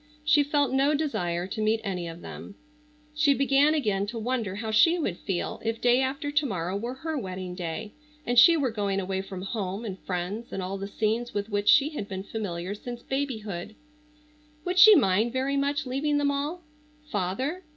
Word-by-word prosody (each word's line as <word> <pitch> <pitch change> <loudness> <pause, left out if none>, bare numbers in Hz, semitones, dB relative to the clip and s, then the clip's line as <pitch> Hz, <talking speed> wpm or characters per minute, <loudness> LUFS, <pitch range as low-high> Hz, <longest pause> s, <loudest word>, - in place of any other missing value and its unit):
She 300 -1 +5
felt 285 -1 +1
no 275 +3 +3
desire 175 - -1
to 195 +3 -5
meet 215 +1 +2
any 180 -5 -3
of 165 +1 -8
them. 200 - -9 0.6
She 300 -2 +3
began 275 +3 +3
again 205 -8 0
to 230 +3 -5
wonder 225 -4 -2
how 220 +1 -4
she 330 +10 +5
would 250 - -1
feel 190 -3 -3
if 225 0 -2
day 245 +1 +4
after 275 +3 -2
to 295 0 +2
morrow 180 -3 -3
were 235 +5 -4
her 315 +4 -4
wedding 185 -7 -5
day, 180 +4 -5 0.3
and 245 0 +4
she 335 +6 +8
were 270 -5 0
going 200 -3 -1
away 190 0 -2
from 190 -1 -7
home 195 +1 -4
and 195 -3 -5
friends 190 +6 -4
and 190 - -3
all 195 +2 -4
the 195 - -4
scenes 220 +3 -1
with 205 +1 -2
which 205 -1 0
she 285 +1 +6
had 290 -10 -5
been 190 -2 -5
familiar 195 -3 -4
since 240 +3 -8
babyhood. 220 -8 -4 0.9
Would 365 +1 0
she 425 +3 +10
mind 220 - +3
very 265 +2 0
much 280 +2 0
leaving 285 +3 0
them 285 -1 +2
all? 295 +5 -3 0.5
Father? 255 - -2
225 Hz, 195 wpm, -27 LUFS, 195-280 Hz, 0.9 s, she